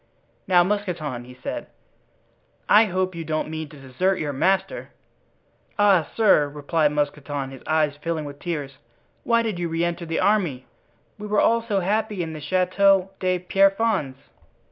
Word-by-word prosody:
"Now, 180 -2 +5
Mousqueton," 175 -11 -3
he 125 0 -13
said, - - -4 1.0
"I 215 +2 +6
hope 185 -1 -1
you 170 -1 -5
don't 155 0 -2
mean 160 -1 -5
to 150 - -14
desert 140 +9 -1
your 150 -4 -3
master?" 190 +8 0 0.9
"Ah, 195 -6 +4
sir," 195 -10 +4
replied 150 +1 0
Mousqueton, 145 -2 -3
his 135 - -11
eyes 155 -2 +1
filling 165 -2 -2
with 145 0 -9
tears, 145 -6 -5 0.4
"why 230 -1 +2
did 215 -6 -3
you 170 -1 -2
re 165 +1 -1
enter 170 0 -4
the 165 - -1
army? 175 -12 +1 0.5
We 210 - -6
were 210 0 +1
all 230 0 +3
so 210 -4 -1
happy 210 0 -1
in 160 -1 -6
the 155 - -8
Chateau 185 +3 +2
de 185 -1 +1
Pierrefonds!" 195 -5 +1
175 Hz, 160 wpm, -23 LUFS, 150-195 Hz, 1.0 s, I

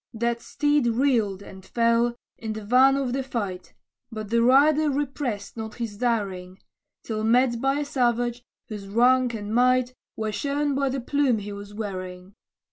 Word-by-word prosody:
That 235 +1 -1
steed 290 -2 +1
reeled, 225 -5 +1
and 190 -1 -12
fell, 235 +3 +1 0.2
in 220 -1 -5
the 215 -1 -7
van 260 +4 +5
of 265 -3 -1
the 270 - 0
fight, 205 -8 -5 0.4
But 215 -1 -6
the 235 0 +3
rider 290 +5 +5
repressed 270 -7 -3
not 220 -1 -6
his 230 -4 -5
daring, 195 -6 -2 0.5
Till 215 -1 -3
met 235 +1 +3
by 270 +2 +1
a - - -2
savage, 245 -3 0 0.3
whose 205 -3 -7
rank 245 +3 +3
and 210 0 -5
might 250 +1 +3 0.2
Were 220 -1 -2
shown 285 +5 -1
by 275 0 0
the 265 0 -3
plume 275 -2 +1
he 205 0 -6
was 205 0 -9
wearing. 185 -3 -6
235 Hz, 165 wpm, -25 LUFS, 210-265 Hz, 0.5 s, van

